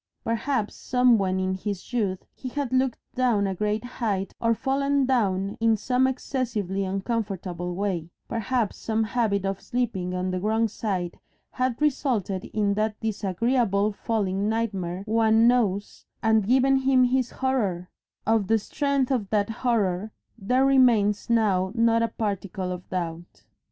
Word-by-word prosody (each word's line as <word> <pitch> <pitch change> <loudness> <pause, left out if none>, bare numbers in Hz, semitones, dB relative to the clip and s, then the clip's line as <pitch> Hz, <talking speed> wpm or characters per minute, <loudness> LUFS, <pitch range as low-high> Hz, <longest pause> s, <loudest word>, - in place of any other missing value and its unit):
Perhaps 230 -1 -1
somewhen 230 -7 +2
in 185 0 0
his 200 +3 -5
youth 200 -6 -1
he 255 - -7
had 275 -1 -3
looked 260 -1 +2 0.2
down 240 -5 +2
a 195 - -1
great 210 +3 -1
height 210 -6 -2
or 230 0 +3
fallen 275 +2 +1
down 200 -6 +1
in 225 -1 +3
some 255 +4 +2
excessively 225 -7 -2
uncomfortable 190 -3 -3
way; 180 -4 -2 0.2
perhaps 230 0 -1
some 220 0 -1
habit 215 -3 0
of 195 0 -2
sleeping 195 -7 -2
on 185 0 -1
the 185 - -1
wrong 220 +3 +1
side 190 -5 -3 0.3
had 255 -2 -1
resulted 250 - 0
in 205 -2 0
that 215 +1 -1
disagreeable 215 0 0
falling 205 -2 -1
nightmare 195 -5 -2
one 225 +1 +4
knows, 210 -5 0 0.2
and 220 -2 +3
given 265 +2 +4
him 265 -1 +4
his 250 0 +2
horror; 210 -10 -1 0.4
of 220 -3 +2
the 225 - +4
strength 280 +4 -1
of 220 -7 0
that 210 0 +1
horror 215 -4 0 0.2
there 250 +5 +1
remains 235 -6 +3
now 200 -5 +2
not 230 0 +3
a 230 - +2
particle 200 -4 -3
of 180 0 -7
doubt. 170 -1 -5
220 Hz, 145 wpm, -25 LUFS, 195-245 Hz, 0.4 s, one